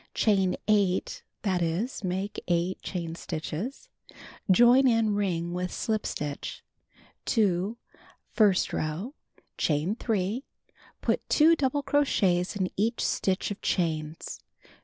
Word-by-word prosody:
Chain 195 -4 +2
8; 200 -4 +1 0.2
that 190 -4 +1
is, 180 +9 -2
make 190 +2 -3
8 175 +1 0
chain 170 -3 -4
stitches. 170 - -5 0.6
Join 240 +7 +6
in 225 -3 +3
ring 175 -4 -1
with 180 0 -2
slip 215 -1 -1
stitch. 145 -1 -5 0.6
2. 205 -1 +1 0.6
First 205 -5 +3
row: 165 - -3 0.5
Chain 155 +5 +1
3. 220 +1 -1 0.6
Put - - -1
2 320 +2 +6
double 285 -1 0
crochets 205 -12 +2
in 190 -2 -1
each 225 +4 0
stitch 190 +1 0
of 205 - -6
chains. 160 -3 -2
195 Hz, 115 wpm, -28 LUFS, 175-225 Hz, 0.6 s, Join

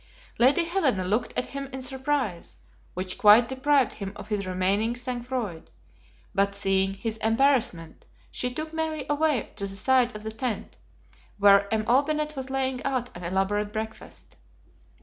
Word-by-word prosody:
Lady 270 +8 +5
Helena 320 - +1
looked 210 +6 0
at - - -1
him 275 0 -4
in 265 0 -7
surprise, 265 -7 -2 0.4
which 185 0 -4
quite 215 +3 +7
deprived 265 -1 +2
him 195 -1 -6
of 215 - -10
his 200 -3 -2
remaining 195 +5 0
sang 245 0 -4
froid; 235 -10 -5 0.6
but 200 0 +1
seeing 195 -1 +1
his 220 +2 -3
embarrassment, 225 - +1 0.3
she 250 - -2
took 310 +5 -6
Mary 320 -1 -2
away 295 -4 0
to 200 -1 -3
the 195 - -6
side 250 +2 +2
of 210 - -7
the 220 - -3
tent, 220 -2 -4 0.6
where 200 0 +5
M. 220 -1 0
Olbinett 300 +5 +1
was 265 -1 -5
laying 265 -1 -1
out 255 -3 -2
an 175 - -8
elaborate 195 +4 0
breakfast. 220 +1 -7
235 Hz, 155 wpm, -26 LUFS, 200-270 Hz, 0.6 s, quite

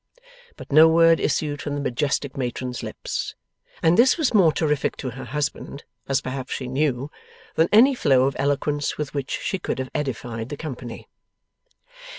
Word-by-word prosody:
But - - -11
no 155 +3 +8
word 165 0 +5
issued 145 -2 -1
from 145 - -3
the - - -3
majestic 140 +1 -1
matron's 125 -1 -4
lips. - - -5 0.5
And 165 +4 +4
this 255 +6 +5
was 310 -7 +1
more 185 -7 +5
terrific 150 -2 0
to 130 - -4
her 130 +2 -8
husband 145 -1 -4 0.3
(as 135 - +2
perhaps 130 0 -5
she 130 - -4
knew) 135 +1 -1 0.4
than 165 +1 +2
any 245 +6 +7
flow 135 - +3
of 135 +1 0
eloquence 145 +1 0
with 150 -2 -4
which 140 -1 -3
she 190 - -2
could - - -3
have 130 0 -4
edified 120 -5 -4
the 145 - -5
company. 125 -6 -7
145 Hz, 165 wpm, -23 LUFS, 130-160 Hz, 0.5 s, no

